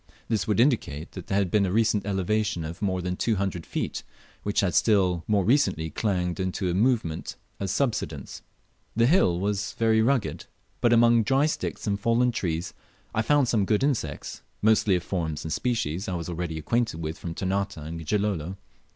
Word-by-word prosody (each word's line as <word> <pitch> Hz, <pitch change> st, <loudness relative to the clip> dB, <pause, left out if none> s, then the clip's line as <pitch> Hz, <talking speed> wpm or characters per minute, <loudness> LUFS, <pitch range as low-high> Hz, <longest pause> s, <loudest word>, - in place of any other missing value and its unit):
This 105 Hz, -6 st, 0 dB
would 105 Hz, 0 st, +1 dB
indicate 115 Hz, -, +1 dB
flat 90 Hz, -, -8 dB
there 95 Hz, -, 0 dB
had 95 Hz, -4 st, +1 dB
been 105 Hz, -2 st, +3 dB
a 95 Hz, -, 0 dB
recent 110 Hz, -1 st, +2 dB
elevation 100 Hz, -2 st, 0 dB
of 85 Hz, +5 st, -7 dB
more 95 Hz, -3 st, -1 dB
than 90 Hz, 0 st, -2 dB
two 110 Hz, +4 st, 0 dB
hundred 95 Hz, -4 st, -3 dB
feet, -, -, -3 dB, 0.4 s
which 100 Hz, -, 0 dB
had 95 Hz, -3 st, 0 dB
still 95 Hz, -6 st, +3 dB
more 100 Hz, -3 st, +2 dB
recently 110 Hz, -, +2 dB
clanged 90 Hz, -2 st, -1 dB
into 95 Hz, 0 st, -1 dB
a -, -, -1 dB
movement 105 Hz, -6 st, 0 dB, 0.2 s
of 100 Hz, -, -2 dB
subsidence. 95 Hz, -, -2 dB, 0.5 s
The 115 Hz, +1 st, +4 dB
hill 120 Hz, -, +3 dB
was 100 Hz, +1 st, -1 dB
very 110 Hz, -1 st, +3 dB
rugged, 115 Hz, -, 0 dB, 0.3 s
but 120 Hz, -, +4 dB
among 115 Hz, 0 st, +5 dB
dry 135 Hz, +6 st, +2 dB
sticks 155 Hz, -, -3 dB
and 100 Hz, -2 st, 0 dB
fallen 115 Hz, +3 st, +2 dB
trees 85 Hz, -6 st, -2 dB, 0.4 s
I 110 Hz, -, +1 dB
found 140 Hz, +3 st, +3 dB
some 110 Hz, -4 st, +2 dB
good 105 Hz, +4 st, +1 dB
insects, 115 Hz, -, -2 dB, 0.2 s
mostly 110 Hz, -2 st, +4 dB
of 90 Hz, -, -1 dB
forms 80 Hz, -5 st, -3 dB
and 80 Hz, -, -3 dB
species 105 Hz, -6 st, -1 dB
I 90 Hz, -, -2 dB
was 85 Hz, 0 st, -4 dB
already 85 Hz, -1 st, -3 dB
acquainted 115 Hz, +2 st, -1 dB
with 80 Hz, 0 st, -4 dB
from 85 Hz, -1 st, -5 dB
Ternate 100 Hz, +1 st, -1 dB
and 80 Hz, +2 st, -6 dB
Gilolo. 95 Hz, -2 st, -1 dB
100 Hz, 185 wpm, -26 LUFS, 85-110 Hz, 0.5 s, among